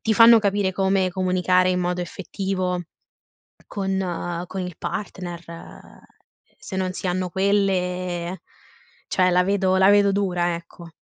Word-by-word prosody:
ti 220 - 0
fanno 230 +1 +8
capire 200 -2 0
come 190 0 +1
comunicare 185 0 +2
in 180 0 +1
modo 180 0 -1
effettivo 185 0 -3 0.9
con 190 -3 -3
con 190 +1 -5
il 180 -2 -6
partner. 180 -4 -5 1.2
Se 190 - -7
non 185 -1 -1
si 185 - -5
hanno 180 0 -1
quelle, 185 -2 -1 0.7
cioè, 185 -1 +2
la 180 0 +3
vedo 190 -1 +1
la 190 0 +5
vedo 205 -1 +5
dura, 180 -3 0
ecco. 170 0 -10
185 Hz, 130 wpm, -23 LUFS, 180-195 Hz, 1.2 s, fanno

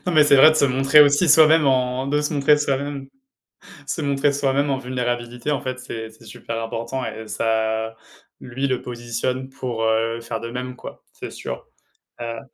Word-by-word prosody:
non, 180 - 0
mais 155 -2 +6
c'est 145 -1 +5
vrai, 145 +4 +8
de 155 - 0
se 140 - +3
montrer 135 +3 +4
aussi 145 +4 +5
soi-même 155 0 +6
en 130 0 +1
de 145 +1 +1
se 150 +1 -2
montrer 145 +1 +4
soi-même 140 -1 -3 0.8
se 160 - -3
montrer 140 0 +1
soi-même 140 +1 0
en 135 - 0
vulnérabilité, 120 0 -3
en 145 - -1
fait, 130 0 -5
c'est 110 -3 -7
c'est 110 +1 -19
super 115 +1 -6
important 115 +3 -4
et 110 0 -7
ça 110 +1 -1 0.4
lui, 130 +2 -3
le 130 -1 -1
positionne 125 +2 -4
pour, 120 -4 -4
heu, 115 +1 0
faire 115 -1 -5
de 115 - -6
même, 125 +1 -6
quoi. - - -11
C'est - - -8
sûr. - - -7 0.6
Heu 115 -1 -5
130 Hz, 185 wpm, -22 LUFS, 115-140 Hz, 0.8 s, vrai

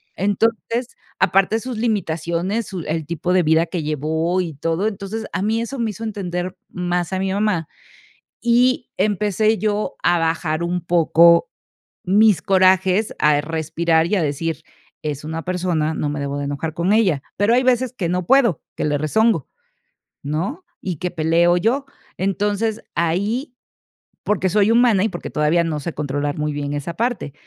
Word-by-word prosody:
Entonces, 225 +5 -1 0.2
aparte 195 +3 +3
de 225 - -5
sus 255 -3 -5
limitaciones, 190 -1 -1
su 190 -3 -5
el 160 0 -2
tipo 170 +2 -1
de 185 - +4
vida 160 +2 +3
que 170 -3 -3
llevó 160 +4 0
y 170 -3 -4
todo, 165 +8 -1
entonces 205 +2 -4
a 180 - -1
mí 225 +2 +1
eso 270 +4 -5
me 230 -2 0
hizo 225 +2 -9
entender 185 -4 -4
más 180 0 -2
a 190 - 0
mi 190 0 -1
mamá, 200 -6 0 0.7
y 245 +1 +2
empecé 210 +2 +1
yo 210 0 -1
a 175 0 +3
bajar 165 0 -1
un 175 +1 -1
poco 170 0 +4 0.5
mis 200 -2 +4
corajes, 190 +2 +3
a 150 -1 +4
respirar 160 +1 0
y 210 - +1
a 180 - +1
decir: 155 +1 -2 0.4
"Es 150 -2 -4
una 160 +1 -4
persona, 175 -4 -1
no 150 - -2
me 145 - -3
debo 140 0 -3
de 145 - -3
enojar 150 +3 -4
con 175 +4 +1
ella". 185 -11 +2 0.2
Pero 205 +4 +3
hay 255 - +4
veces 255 0 +2
que 180 -8 -2
no 180 -1 -1
puedo, 235 - +3
que - - -2
le 145 -1 +1
rezongo, 180 - +1 0.8
¿no?, 180 - -3 0.2
y 180 -5 -4
que 180 - -2
peleo 170 +1 +3
yo. 245 +10 +1 0.3
Entonces, 205 +3 -1
ahí, 205 - -1 0.7
porque 190 -3 +1
soy 205 +2 +3
humana, 230 -5 +4
y 220 - +2
porque 175 - -6
todavía 155 +3 +2
no 155 -2 -2
sé 170 +3 -5
controlar 145 0 -2
muy 150 0 -1
bien 145 0 -3
esa 145 +3 -4
parte, 230 - -2
180 Hz, 170 wpm, -20 LUFS, 160-215 Hz, 0.8 s, de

